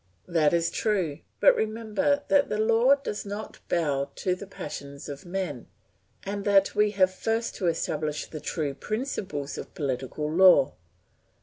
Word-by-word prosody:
That 165 -4 +3
is 170 -1 +1
true; 185 -9 0 0.2
but - - +6
remember 230 +7 0
that 285 -1 +3
the 210 - -1
law 230 +5 +4
does 240 -7 -5
not 205 +2 -7
bow 145 -5 0
to 185 - 0
the 185 +2 -7
passions 140 -6 -8
of 145 +3 -8
men, 175 -8 -4 0.6
and 200 +1 -4
that 200 -1 +4
we 210 0 +3
have 185 -1 +4
first 225 +4 -1
to 185 - -1
establish 155 -2 -1
the 155 - -8
true 150 -1 -2
principles 190 - -4
of - - -9
political 135 +1 -3
law. 175 -6 +6
185 Hz, 150 wpm, -27 LUFS, 150-215 Hz, 0.6 s, but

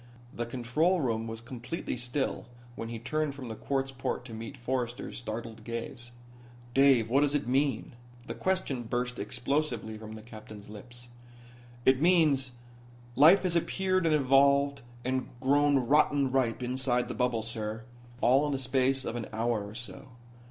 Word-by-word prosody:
The 120 0 -3
control 130 +10 +1
room 115 -5 -1
was 115 0 -6
completely 125 +6 -5
still 125 +1 -2 0.3
when 115 -1 -6
he 115 - -4
turned 145 +4 -2
from 130 -4 -7
the 110 - -5
quartz 135 +3 -2
port 130 -1 -3
to 120 - -9
meet 115 +5 -7
Forrester's 125 -1 -3
startled 115 -1 -6
gaze. 115 +1 -5 0.6
"Dave, 130 -4 +5
what 135 +3 +5
does 145 0 +2
it 145 - -1
mean?" 135 +2 +1 0.3
The - - -5
question 185 -9 -1
burst 125 +1 -2
explosively 125 -4 -2
from 110 0 -8
the 110 - -10
captain's 110 -2 -11
lips. 120 +3 -10 0.8
"It 130 +1 +5
means 155 -7 +4 0.6
life 165 +9 +7
has 180 -2 0
appeared 185 +1 +1
and 155 - +4
evolved 140 0 +4 0.2
and 130 0 -1
grown 145 +2 +3
rotten 140 +1 +3
ripe 125 -2 +1
inside 125 0 +1
the - - -4
bubble, 125 -3 0
sir. 110 0 -4 0.4
All 135 +4 +4
in 145 - -1
the - - 0
space 130 0 +1
of - - -3
an 120 -2 -4
hour 115 -1 0
or 100 +1 -9
so." 125 +3 -4
125 Hz, 160 wpm, -30 LUFS, 115-140 Hz, 0.8 s, life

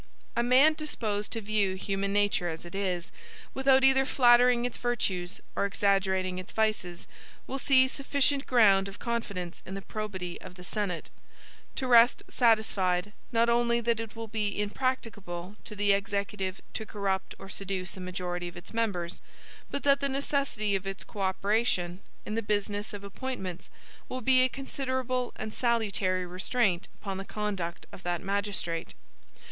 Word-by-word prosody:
A 235 - +3
man 260 +6 +6
disposed 220 -10 -2
to 225 - -2
view 205 -2 +1
human 195 +1 -2
nature 205 -3 +2
as 160 +1 -6
it 175 - -10
is, 185 -3 -2 0.4
without 265 0 +4
either 265 0 +6
flattering 245 -2 +5
its 245 - -3
virtues 190 -7 -1 0.2
or - - +1
exaggerating 190 -2 +1
its 185 - -8
vices, 215 -6 -1 0.4
will 270 - -4
see 260 -1 +5
sufficient 280 +1 +1
ground 200 -6 +5
of 195 - -9
confidence 200 -7 -3
in 190 - -7
the 195 - -5
probity 190 -5 -5
of 180 - -10
the 180 - -11
Senate, 190 -2 -3 0.6
to 265 - -2
rest 240 -1 +6
satisfied, 205 -5 +2 0.2
not 230 0 +3
only 235 0 +3
that 235 -1 +1
it 225 -1 -6
will 225 0 -5
be 210 -2 -1
impracticable 205 -5 -2
to 210 - -7
the 205 0 +3
Executive 200 -1 -2
to - - -2
corrupt 200 -3 -2
or - - -10
seduce 190 -1 -3
a - - -9
majority 180 -1 -3
of 175 - -9
its 175 - -10
members, 190 -7 -1 0.5
but 280 - -3
that 280 -1 +5
the 280 - 0
necessity 275 -6 0
of 195 0 -2
its 195 0 -4
co 210 - -11
operation, 190 -2 +1 0.3
in 210 - -4
the 225 - 0
business 205 0 -1
of 205 -1 -7
appointments, 200 -4 -5 0.4
will 255 - -4
be 255 +2 +5
a 255 - +4
considerable 260 -2 -2
and 215 - -5
salutary 200 -6 +1
restraint 185 +1 0
upon 195 -2 -4
the - - -4
conduct 195 -5 -3
of - - -11
that 175 0 -2
magistrate. 195 -4 -2
205 Hz, 160 wpm, -29 LUFS, 190-240 Hz, 0.6 s, man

